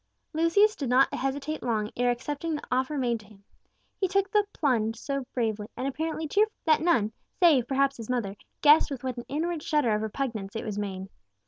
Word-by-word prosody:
Lucius 335 +7 +4
did 275 -4 -3
not 260 +2 +4
hesitate 280 +3 -2
long 215 -3 -1
ere 245 0 +2
accepting 290 +6 -2
the 295 - -6
offer 260 +4 0
made 240 -3 0
to 210 - -16
him. 200 -1 -19 0.6
He 380 - +2
took 390 +1 0
the 415 -1 +3
"plunge" 225 - +1
so 275 +1 -4
bravely, 220 -4 -1
and 260 - -2
apparently 315 +3 -3
cheerfully, 425 +7 +2
that 310 -1 +4
none, 310 -11 +2 0.3
save 300 - +5
perhaps 275 0 +1
his 230 -1 -8
mother, 230 -6 -1 0.3
guessed 300 +2 +7
with 270 -3 -6
what 255 -1 -3
an 240 - -6
inward 325 +3 -2
shudder 295 -8 +1
of 210 - 0
repugnance 220 -3 -4
it 225 - -4
was 210 -2 -3
made. 190 -2 -4
265 Hz, 200 wpm, -27 LUFS, 225-310 Hz, 0.6 s, guessed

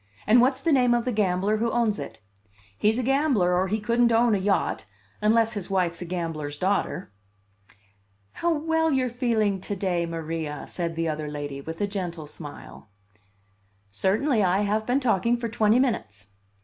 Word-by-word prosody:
And 235 +3 +6
what's 260 +1 +2
the 325 - +1
name 250 -4 +4
of 235 - -1
the 250 - 0
gambler 205 -1 +1
who 230 +2 0
owns 230 -3 0
it? 110 0 -8 0.5
He's 215 - +2
a 255 - -1
gambler, 260 -9 +2
or 185 +2 +1
he 215 +3 -1
couldn't 235 +2 +2
own 230 0 +4
a 200 - +2
yacht 195 +1 0 0.4
unless 225 +1 +3
his 205 -4 -6
wife's 180 -3 0
a - - -4
gambler's 165 -4 -4
daughter." 185 - -1 1.2
"How 345 - -1
well 320 +1 +1
you're 260 -2 +1
feeling 220 -6 0
to 205 - -4
day, 180 -3 -1
Maria!" 160 -3 -4
said 170 -2 -3
the 165 0 -1
other 155 -1 -3
lady, 145 -2 -5
with 160 +5 -7
a - - +3
gentle 180 -6 -5
smile. 145 -7 -10 1.0
"Certainly. 215 - +1
I 185 +2 +2
have 215 +1 0
been 250 +3 +2
talking 235 -2 +1
for 235 -1 -4
twenty 220 0 +3
minutes." 105 - -2
205 Hz, 175 wpm, -25 LUFS, 170-235 Hz, 1.2 s, And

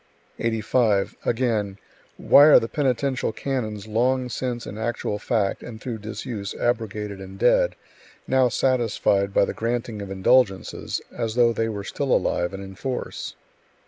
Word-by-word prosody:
85. 110 -2 +1
Again: 110 -5 0 0.4
"Why 145 - +7
are 155 - +8
the 115 - -3
penitential 130 -2 0
canons 110 -6 -3
long 125 +3 +1
since 120 -1 -3
in - - -7
actual 110 -2 -2
fact 100 -3 0
and 110 -2 -9
through 115 -1 -5
disuse 105 -1 -5
abrogated 105 -4 -2
and 95 0 -9
dead, - - +3 0.5
now 130 -1 +3
satisfied 115 -6 +1
by 100 - +4
the - - -4
granting 115 -2 -3
of 100 - -6
indulgences, 95 +1 +1
as 115 -1 -2
though 120 -1 +4
they 115 0 -1
were 100 -2 -4
still 135 +5 -3
alive 85 0 +1
and 95 0 -7
in 95 0 -9
force?" 125 +6 -5
115 Hz, 145 wpm, -24 LUFS, 100-125 Hz, 0.5 s, are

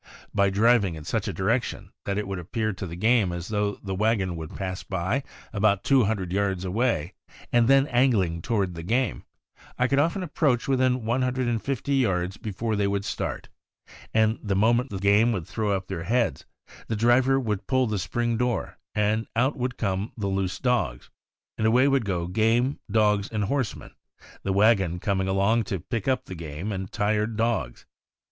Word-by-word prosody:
By 100 -1 +3
driving 105 -2 +3
in 80 - -8
such - - -2
a - - -1
direction 115 +6 -1
that 100 0 -1
it 105 - -2
would 95 -2 -4
appear 110 +5 -2
to 95 0 -6
the 85 - -7
game 110 0 +3
as 85 0 -5
though 105 -1 0
the 95 -1 -3
wagon 100 -3 +1
would 80 -2 -7
pass 95 -2 -4
by 95 +8 -1 0.3
about 100 -1 +2
two 135 -4 +4
hundred 95 -4 -2
yards 95 -2 0
away, 110 -3 0 0.4
and 120 -1 +4
then 135 +1 +5
angling 115 - +2
toward 100 -3 0
the 85 - -7
game, 120 +7 -1 0.5
I 125 - +2
could 140 +1 +2
often 170 +6 +1
approach 145 -7 0
within 130 -3 +1
one 120 +3 +1
hundred 125 0 0
and 115 -2 0
fifty 135 +1 -2
yards 95 -6 0
before 110 +1 -3
they 100 -1 +1
would 100 0 -1
start; - - -4 0.6
and 110 0 +2
the 100 -3 -1
moment 120 +6 +3
the 100 - -4
game 100 +4 +4
would 90 -7 -3
throw 110 +2 -2
up 95 -2 0
their 95 -3 -5
heads, 120 +3 0 0.4
the 110 - -1
driver 125 +4 +4
would 105 -6 -3
pull 130 -1 +2
the 105 -3 -1
spring 120 +5 -1
door, 125 0 -2 0.6
out 130 +5 +2
would 125 -2 -3
come 100 0 -2
the 105 - -3
loose 95 -1 -1
dogs, 120 - -1 0.5
and 110 - +2
away 125 +4 +4
would 135 -4 +2
go 90 -4 -1
game, 115 +8 +1
dogs, 105 -1 +2
and 105 -2 -1
horsemen, 130 +1 -2 0.5
the 100 - -2
wagon 95 -3 +3
coming 95 +1 -1
along 100 +4 +2
to 95 -1 -3
pick 105 +4 -4
up 130 -1 +1
the - - -8
game 85 +4 -5
and 95 -1 -4
tired 105 +1 0
dogs. 110 - -1
105 Hz, 185 wpm, -26 LUFS, 95-120 Hz, 0.6 s, then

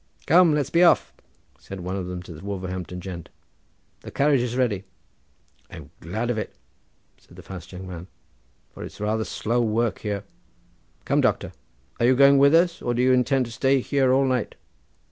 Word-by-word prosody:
"Come, 170 -1 +5
let's 145 -1 -1
be 170 - +3
off," 175 - +4 0.5
said 95 -1 -9
one 90 +2 -4
of 95 -2 -4
them 90 0 -6
to 90 - -10
the 80 - -12
Wolverhampton 95 -2 -5
gent; 90 -3 -8 0.7
"the - - -10
carriage 140 -2 +2
is 125 0 -3
ready." 110 -7 0 0.9
"I'm 75 -2 -11
glad 110 +9 -3
of 110 - -2
it," - - -6 0.6
said - - -20
the - - -12
fast 90 -2 -10
young 95 0 -8
man, 90 -1 -8 0.6
"for - - -9
it's - - -10
rather 110 +2 -1
slow 120 +2 -1
work 115 0 0
here. 100 -2 -3 0.8
Come, - - +2
doctor! - - 0 0.5
are 120 - +3
you 130 - +5
going 140 +1 +6
with 140 +3 +6
us 170 0 +2
or 120 - -1
do 120 - +1
you 130 - +4
intend 130 +1 +2
to 115 - -9
stay 135 +4 +2
here 135 0 +1
all 135 +1 +3
night?" 130 -3 -1
115 Hz, 185 wpm, -24 LUFS, 95-135 Hz, 0.9 s, going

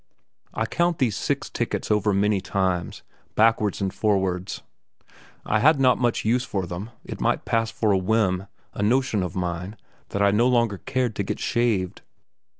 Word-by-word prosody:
I 110 - 0
count 170 +6 0
these 120 -7 +1
six - - -2
tickets - - -3
over 105 0 +2
many 100 0 +2
times, 95 -3 -2 0.3
backwards 110 -3 +2
and 95 -1 -1
forwards; 95 -3 -1 0.8
I 110 - +1
had 150 +4 +5
not 130 -2 +4
much 120 -3 0
use 120 +3 +2
for 95 -6 -3
them; 90 +6 -6 0.2
it - - -7
might - - 0
pass 115 -1 +1
for 110 -2 0
a 95 - +4
whim 95 -1 +1 0.3
a - - -5
notion 120 0 +2
of 90 -3 -4
mine 90 +3 -3 0.3
that 100 - 0
I 100 - +5
no 115 +4 +3
longer 115 -6 +2
cared 130 -4 -1
to 100 - 0
get - - -4
shaved. 110 -7 0
105 Hz, 170 wpm, -24 LUFS, 95-120 Hz, 0.8 s, had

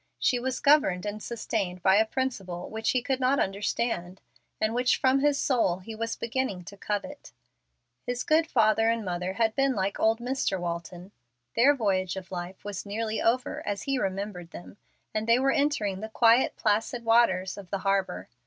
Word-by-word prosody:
She 250 - +1
was 255 +1 -2
governed 280 -12 +3
and 210 +1 -4
sustained 200 -6 -3
by 190 +1 +5
a 220 +1 +3
principle 195 -9 -3
which 220 0 -2
he 250 -2 +1
could 265 0 -1
not 260 +2 +2
understand, 195 -2 -2 0.4
and 215 +1 +1
which 250 +1 +2
from 265 +1 +3
his 285 0 +2
soul 230 -10 +2
he 190 +5 -9
was 230 +1 -3
beginning 230 -6 -2
to 200 - -10
covet. 210 - -5 0.7
His 245 0 -2
good 320 +1 +3
father 225 -5 +3
and 230 -2 -1
mother 180 +1 -2
had 220 +1 +1
been 270 0 +1
like 195 0 -1
old 225 +1 +3
Mr. 245 -6 -1
Walton. 175 +2 -5 0.4
Their 275 +5 +5
voyage 190 -7 0
of 190 -1 -8
life 180 +2 -6
was 205 -2 -5
nearly 215 +2 -3
over 245 +2 0
as 205 -1 -3
he 275 -2 -1
remembered 190 -4 -3
them, 175 - -11 0.4
and 215 +1 -2
they 230 +1 +5
were 270 +1 +2
entering 275 -11 0
the 220 +2 -6
quiet, 230 +2 +4
placid 225 +3 0
waters 210 -5 +3
of 195 -3 -11
the 195 - -1
harbor. 195 - 0
220 Hz, 180 wpm, -27 LUFS, 190-245 Hz, 0.7 s, by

